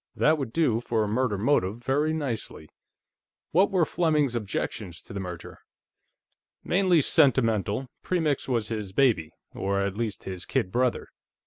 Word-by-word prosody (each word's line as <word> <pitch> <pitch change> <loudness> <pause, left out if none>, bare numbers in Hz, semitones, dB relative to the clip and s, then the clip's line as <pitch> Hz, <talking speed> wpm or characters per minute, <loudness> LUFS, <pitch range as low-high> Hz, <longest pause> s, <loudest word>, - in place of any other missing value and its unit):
"That 155 0 +3
would 130 -5 -3
do 120 -7 +2
for 115 -2 0
a - - -1
murder 110 -1 0
motive, 105 -3 +1
very 145 +5 +1
nicely.... 125 - -4 0.8
What 185 +5 +4
were 180 -4 +2
Fleming's 155 -7 +1
objections 105 -4 -4
to - - -10
the 100 - -4
merger?" 90 -3 -7 1.0
"Mainly 180 -3 +3
sentimental. 115 -4 +2 0.2
Premix 160 -6 0
was 115 -5 0
his 105 -4 -4
baby, 110 -11 +2 0.2
or, 100 0 -1
at 100 -1 -2
least, 110 -1 -3
his 95 -2 -6
kid 90 - -1
brother. 125 +2 0
115 Hz, 145 wpm, -26 LUFS, 100-145 Hz, 1.0 s, What